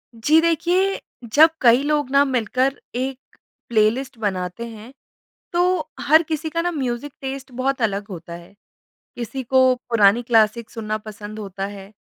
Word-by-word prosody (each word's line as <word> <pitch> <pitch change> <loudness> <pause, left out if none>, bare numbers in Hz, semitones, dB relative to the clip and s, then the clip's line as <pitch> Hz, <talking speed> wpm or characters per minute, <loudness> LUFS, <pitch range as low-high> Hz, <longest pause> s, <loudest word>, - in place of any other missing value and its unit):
जी। 290 +8 +4
देखिए 350 +4 +1 0.3
जब 315 +2 +8
कई 240 +1 +6
लोग 295 -2 0
ना 280 0 +5
मिलकर 255 +1 0 0.2
एक 260 +1 -2 0.5
प्लेलिस्ट 235 +4 +1
बनाते 190 +1 -3
हैं 225 +2 -11 0.6
तो 345 - +2 0.4
हर 315 +2 +5
किसी 315 0 -3
का 335 +2 -1
ना 350 +1 -1
म्यूज़िक 265 -2 -3
टेस्ट 270 0 -6
बहुत 260 +1 -2
अलग 205 -2 -1
होता 170 -2 -8
है 170 +2 -11 0.6
किसी 240 +3 -5
को 260 +1 +4
पुरानी 225 0 +4
क्लासिक 225 -1 +2
सुनना 215 -2 -4
पसंद 210 0 -8
होता 195 -2 -5
है 200 0 -10
245 Hz, 150 wpm, -21 LUFS, 215-275 Hz, 0.6 s, जब